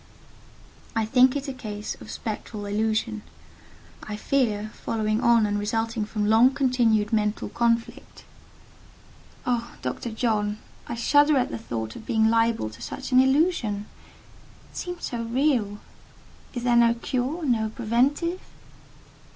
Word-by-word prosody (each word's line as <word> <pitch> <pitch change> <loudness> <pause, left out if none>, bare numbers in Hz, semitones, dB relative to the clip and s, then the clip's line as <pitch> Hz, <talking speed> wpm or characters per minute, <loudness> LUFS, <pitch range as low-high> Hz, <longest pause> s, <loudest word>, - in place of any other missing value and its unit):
"I 225 -1 +1
think 250 +4 +4
it 285 0 -3
a 270 - -3
case 210 -4 -6
of - - -11
spectral 215 -1 -5
illusion: 215 +1 -1 0.8
I 210 - -6
fear, 215 -3 0
following 215 0 -1
on 235 -2 +5
and 205 0 -1
resulting 225 +1 -1
from 210 0 -2
long 230 +5 +5
continued 240 -5 +2
mental 210 -1 0
conflict." 235 -1 -1 1.2
"Oh, 240 -1 -1
Doctor 130 - -3
John—I 220 0 -3
shudder 290 +5 +4
at 250 - 0
the 115 - -4
thought 110 -1 -5
of - - -11
being 220 -1 +3
liable 230 - +1
to - - -14
such 270 -1 -6
an 255 - +6
illusion! 265 - +2 0.9
It - - -12
seemed 355 -1 -5
so 240 -2 -3
real. 230 -3 +1 0.8
Is 245 - -3
there 245 -1 +3
no 235 0 +5
cure?—no 250 -2 -1
preventive?" 265 - 0
230 Hz, 130 wpm, -25 LUFS, 215-255 Hz, 1.2 s, an